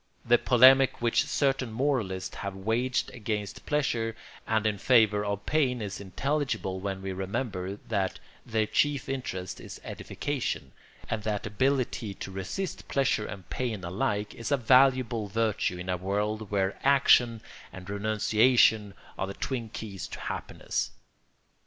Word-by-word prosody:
The 120 Hz, +1 st, +5 dB
polemic 130 Hz, +1 st, +6 dB
which 120 Hz, -1 st, +2 dB
certain 135 Hz, -4 st, +1 dB
moralists 110 Hz, -7 st, -1 dB
have 100 Hz, -1 st, -4 dB
waged 115 Hz, +6 st, 0 dB
against 105 Hz, -4 st, -4 dB
pleasure 115 Hz, -7 st, 0 dB, 0.3 s
and 110 Hz, -1 st, +1 dB
in 105 Hz, -2 st, 0 dB
favour 110 Hz, -4 st, +4 dB
of 100 Hz, 0 st, -3 dB
pain 135 Hz, -5 st, +1 dB
is 100 Hz, -3 st, -5 dB
intelligible 125 Hz, -, -2 dB
when 95 Hz, 0 st, -4 dB
we 95 Hz, 0 st, -3 dB
remember 95 Hz, 0 st, -3 dB
that 100 Hz, -4 st, -1 dB, 0.3 s
their 110 Hz, -2 st, 0 dB
chief 145 Hz, +4 st, +1 dB
interest 125 Hz, -9 st, -4 dB
is -, -, -9 dB
edification, 145 Hz, -3 st, -4 dB, 0.4 s
and 115 Hz, -1 st, -2 dB
that 105 Hz, -1 st, -2 dB
ability 120 Hz, -2 st, 0 dB
to 95 Hz, -, -7 dB
resist 95 Hz, -, -4 dB
pleasure 135 Hz, -6 st, +1 dB
and 95 Hz, -4 st, -8 dB
pain 115 Hz, -7 st, -2 dB
alike 105 Hz, +3 st, -1 dB
is 115 Hz, -, -5 dB
a 140 Hz, -, +4 dB
valuable 125 Hz, -3 st, +4 dB
virtue 110 Hz, -3 st, 0 dB
in 90 Hz, +1 st, -7 dB
a 90 Hz, 0 st, 0 dB
world 105 Hz, +3 st, -2 dB
where 95 Hz, -1 st, 0 dB
action 125 Hz, -4 st, +5 dB, 0.3 s
and 90 Hz, -1 st, -10 dB
renunciation 110 Hz, +1 st, +3 dB, 0.2 s
are 95 Hz, -, -1 dB
the 100 Hz, -, -6 dB
twin 120 Hz, -4 st, -3 dB
keys 105 Hz, -3 st, -6 dB
to -, -, -8 dB
happiness. -, -, -3 dB
110 Hz, 140 wpm, -28 LUFS, 100-130 Hz, 0.4 s, polemic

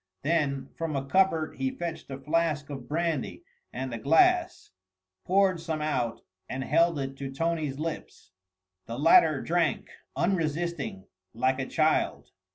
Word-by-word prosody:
Then 145 Hz, -3 st, 0 dB
from 165 Hz, -2 st, -3 dB
a 135 Hz, 0 st, -2 dB
cupboard 165 Hz, 0 st, +2 dB
he 135 Hz, 0 st, 0 dB
fetched 165 Hz, +1 st, -6 dB
a 135 Hz, -, -5 dB
flask 150 Hz, 0 st, -1 dB
of 135 Hz, -4 st, -7 dB
brandy 160 Hz, -3 st, -2 dB, 0.3 s
and 130 Hz, 0 st, -4 dB
a 115 Hz, -, -4 dB
glass, 350 Hz, -, +3 dB, 0.5 s
poured 185 Hz, -2 st, +3 dB
some 160 Hz, -2 st, -3 dB
out 130 Hz, -7 st, -1 dB, 0.3 s
and 130 Hz, +1 st, -3 dB
held 165 Hz, +3 st, +3 dB
it 135 Hz, -1 st, -4 dB
to 135 Hz, -1 st, -5 dB
Tony's 155 Hz, -1 st, -1 dB
lips. 155 Hz, -, -6 dB, 0.6 s
The 115 Hz, -, -5 dB
latter 155 Hz, -1 st, +5 dB
drank 165 Hz, -4 st, 0 dB, 0.3 s
unresisting 170 Hz, -, -1 dB, 0.3 s
like 130 Hz, +3 st, +1 dB
a 130 Hz, -, -2 dB
child. 155 Hz, 0 st, +1 dB
155 Hz, 140 wpm, -28 LUFS, 135-165 Hz, 0.6 s, latter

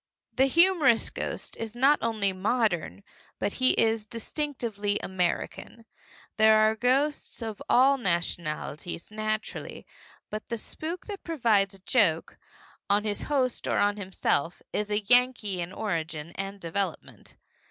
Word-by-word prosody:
The 265 Hz, +1 st, +3 dB
humorous 320 Hz, -6 st, +4 dB
ghost -, -, -5 dB
is 225 Hz, 0 st, -5 dB
not 275 Hz, +4 st, +4 dB
only 215 Hz, -4 st, +1 dB
modern, 200 Hz, -2 st, 0 dB, 0.3 s
but 205 Hz, -, -2 dB
he 255 Hz, -, +5 dB
is 225 Hz, -1 st, +1 dB
distinctively 230 Hz, -4 st, -3 dB
American. 190 Hz, +5 st, -3 dB, 0.5 s
There 220 Hz, 0 st, +6 dB
are 215 Hz, 0 st, +4 dB
ghosts 260 Hz, +3 st, 0 dB
of 220 Hz, -2 st, -6 dB
all 270 Hz, +2 st, +5 dB
nationalities, 170 Hz, -3 st, -2 dB
naturally, 215 Hz, 0 st, -4 dB, 0.5 s
but 215 Hz, +1 st, -6 dB
the 235 Hz, -, -2 dB
spook 325 Hz, +9 st, -5 dB
that 405 Hz, -3 st, -7 dB
provides 220 Hz, -, +1 dB
a -, -, -12 dB
joke 175 Hz, -10 st, +2 dB, 0.5 s
on 205 Hz, +1 st, +3 dB
his 210 Hz, -1 st, -2 dB
host 260 Hz, -4 st, -1 dB
or -, -, +1 dB
on 205 Hz, 0 st, +2 dB
himself 180 Hz, -4 st, -1 dB
is 210 Hz, 0 st, -1 dB
Yankee 215 Hz, -2 st, +2 dB
in 170 Hz, +1 st, -5 dB
origin 165 Hz, -6 st, -3 dB
and 195 Hz, +2 st, -6 dB
development. 185 Hz, 0 st, -5 dB
215 Hz, 130 wpm, -27 LUFS, 195-250 Hz, 0.5 s, There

